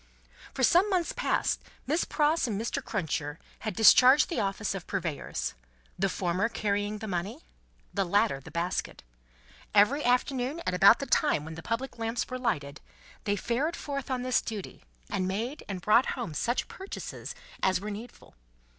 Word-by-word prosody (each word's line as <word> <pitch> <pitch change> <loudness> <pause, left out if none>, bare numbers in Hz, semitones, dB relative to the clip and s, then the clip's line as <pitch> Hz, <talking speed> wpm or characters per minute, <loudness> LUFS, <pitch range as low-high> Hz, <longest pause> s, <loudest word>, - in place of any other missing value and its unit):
For 265 - -1
some 355 - +5
months 365 -4 0
past, - - 0 0.2
Miss 315 +5 +1
Pross 300 -1 +2
and 210 -3 -2
Mr. 230 - -2
Cruncher 160 -7 -2 0.2
had 215 -4 -4
discharged 255 +6 +7
the 340 - -1
office 200 +1 -1
of 195 -3 -7
purveyors; 170 -7 -3 0.5
the 195 +1 +2
former 185 +4 0
carrying 205 -1 -1
the 220 +1 -6
money; 195 - -3 0.5
the 200 - +1
latter, 200 -4 +2
the 140 - -12
basket. 170 +3 -3 0.7
Every 250 +9 +5
afternoon 250 +4 +1
at - - 0
about 195 +5 +7
the 275 - -4
time 275 - +2
when 160 - -7
the 160 - -8
public 230 +6 -3
lamps 225 +1 -1
were 255 - -5
lighted, 150 - -2 0.4
they 205 -1 +1
fared 255 - -1
forth 275 -2 -5
on 255 -1 -1
this 255 0 +2
duty, 210 -4 -7 0.2
and 185 - -1
made 225 +9 -3
and 190 -2 -4
brought 225 +4 +4
home 235 -11 -4
such 240 +10 0
purchases 385 +1 -7 0.3
as 190 -1 +2
were 210 +2 -5
needful. 220 +4 -10
220 Hz, 165 wpm, -29 LUFS, 190-255 Hz, 0.7 s, discharged